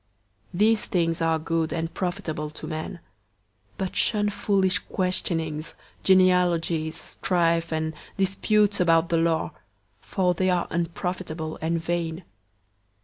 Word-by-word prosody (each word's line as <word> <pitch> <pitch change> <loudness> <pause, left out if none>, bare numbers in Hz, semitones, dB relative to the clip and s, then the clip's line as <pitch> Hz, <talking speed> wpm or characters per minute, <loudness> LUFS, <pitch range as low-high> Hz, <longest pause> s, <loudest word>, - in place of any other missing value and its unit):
These 215 +4 +3
things 165 -3 0
are 165 0 +2
good 160 0 -1
and 165 0 -2
profitable 175 -5 -3
to 155 - -9
men; 155 +4 -4
003:009 - - -14 0.8
but 190 -1 -3
shun 210 -2 +2
foolish 195 -2 +1
questionings, 165 -4 -2 0.3
genealogies, 175 -4 +3
strife, 170 -2 0
and 160 0 -1 0.2
disputes 200 +2 +2
about 165 -1 +4
the 170 - +2
law; 165 -1 +1 0.5
for 180 -2 0
they 185 +2 +1
are 180 -1 +2
unprofitable 170 -1 -3
and 165 +1 0
vain. 165 +1 -2
170 Hz, 120 wpm, -25 LUFS, 165-185 Hz, 0.8 s, about